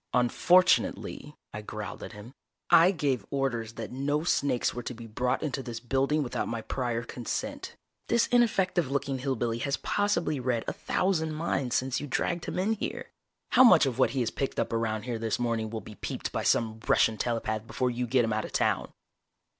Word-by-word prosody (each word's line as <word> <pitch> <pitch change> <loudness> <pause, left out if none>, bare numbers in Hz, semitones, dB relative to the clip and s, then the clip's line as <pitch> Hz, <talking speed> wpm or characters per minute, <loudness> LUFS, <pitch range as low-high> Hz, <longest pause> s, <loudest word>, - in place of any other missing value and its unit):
"Unfortunately," 150 +2 +2 0.2
I 105 - -5
growled 105 0 -7
at - - -8
him. 105 +4 -11 0.4
"I 170 +2 +8
gave 145 -9 0
orders 120 -5 -2
that 115 -2 -6
no 145 +4 -1
snakes 140 -7 +1
were 120 - -4
to 120 +1 -6
be 115 0 -9
brought 125 +3 -1
into 140 -3 -2
this 120 -3 -6
building 135 +5 +1
without 125 - -3
my 115 -1 -4
prior 120 -2 -2
consent. 120 0 -5 0.3
This 235 0 +3
ineffective 195 - +2
looking 135 -1 -1
hill 135 +1 -1
billy 115 -1 -1
has 140 +3 -1
possibly 205 -8 0
read 125 -2 0
a - - -1
thousand 165 -4 0
minds 140 -6 -1
since 130 +1 0
you 145 - -5
dragged 170 +5 -1
him - - -4
in 195 +4 +1
here. 215 - -5 0.4
How 255 - +7
much 180 - +7
of 130 -2 -2
what - - +5
he 130 - -1
has 120 - -1
picked 135 - -3
up - - -1
around 110 -2 -1
here 120 -2 -3
this 115 -1 -1
morning 115 -2 -1
will 110 0 -5
be 105 - -11
peeped - - -5
by - - -2
some 110 -1 +1
Russian 110 - +4
telepath 115 -2 -2
before 125 +1 -1
you 125 0 -2
get 125 -1 +3
him 110 - -1
out 110 0 -1
of - - -10
town?" - - +1
125 Hz, 200 wpm, -28 LUFS, 115-150 Hz, 0.4 s, I